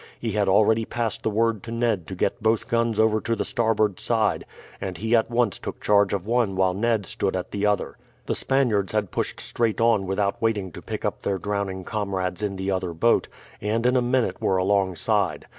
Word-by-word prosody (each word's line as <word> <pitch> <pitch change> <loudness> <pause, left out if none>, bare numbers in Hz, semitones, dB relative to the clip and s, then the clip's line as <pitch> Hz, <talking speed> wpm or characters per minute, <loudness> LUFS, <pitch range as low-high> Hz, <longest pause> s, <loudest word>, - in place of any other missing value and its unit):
He 115 - -2
had 100 -1 +1
already 110 +3 +4
passed 115 -1 -3
the - - 0
word 110 0 +1
to 115 - -8
Ned 115 -6 0
to 95 - -6
get 115 - -1
both 110 +1 +1
guns 115 -3 0
over 110 -1 +3
to 115 - -1
the - - -2
starboard 110 -4 +1
side, 110 -3 0 0.3
and 95 -3 -4
he 110 +5 +1
at 115 0 +2
once 120 -3 +1
took - - -6
charge 100 -2 +3
of 100 -2 -2
one 115 -3 +1
while 95 -1 +2
Ned 110 +1 0
stood 95 +1 -2
at 90 - -4
the 100 0 0
other. 105 0 -1 0.3
The - - -1
Spaniards 115 -8 +1
had 105 -4 0
pushed - - -3
straight 115 -2 0
on 115 -4 +3
without 100 +1 -1
waiting 105 -5 0
to - - -10
pick - - -5
up - - -2
their 100 - -1
drowning 100 -1 -3
comrades 95 -3 -3
in 100 -2 -2
the 95 +1 -2
other 95 -2 -2
boat, 115 +9 +2 0.3
and 110 +3 -1
in 125 +1 +3
a 125 - +4
minute 125 0 0
were 95 - +2
alongside. 95 -1 +1
105 Hz, 210 wpm, -24 LUFS, 95-115 Hz, 0.3 s, already